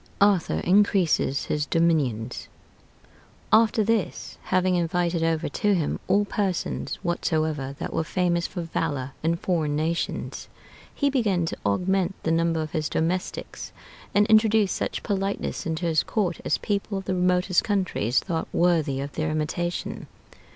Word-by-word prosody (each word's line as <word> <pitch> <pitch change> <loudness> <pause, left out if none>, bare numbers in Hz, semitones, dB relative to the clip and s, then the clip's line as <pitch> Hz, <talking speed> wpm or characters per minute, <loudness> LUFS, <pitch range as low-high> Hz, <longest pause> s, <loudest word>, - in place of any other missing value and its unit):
ARTHUR 200 -4 +3
INCREASES 185 -7 +2
HIS 150 -1 -1
DOMINIONS 140 -9 0 1.1
After 220 0 +5
this, 225 -1 -1
having 185 0 +2
invited 175 0 0
over 165 0 +1
to 205 -2 +1
him 165 -5 -1
all 200 +2 +3
persons 195 -3 -2
whatsoever 155 -5 -1
that - - -5
were - - 0
famous 175 0 0
for 175 -3 -5
valor 145 -5 -2
in 165 +2 +1
foreign 165 -4 -1
nations, 160 +3 -2 0.4
he 285 -1 0
began 205 -10 +1
to - - -4
augment 185 - +1
the 160 - 0
number 165 -1 +1
of 155 - -7
his 155 -2 -1
domestics, 175 +3 -3 0.4
and 205 +1 +5
introduced 220 -2 +4
such - - -3
politeness 195 -4 -2
into 165 +2 -2
his 160 -2 +3
court 185 -6 -1
as - - +1
people 200 0 -2
of 195 - -6
the 190 - -1
remotest 180 0 +2
countries 185 - 0
thought 165 -4 -3
worthy 165 -6 +2
of 140 +1 -5
their 155 +1 -2
imitation. 160 +3 -3
175 Hz, 145 wpm, -25 LUFS, 160-195 Hz, 1.1 s, After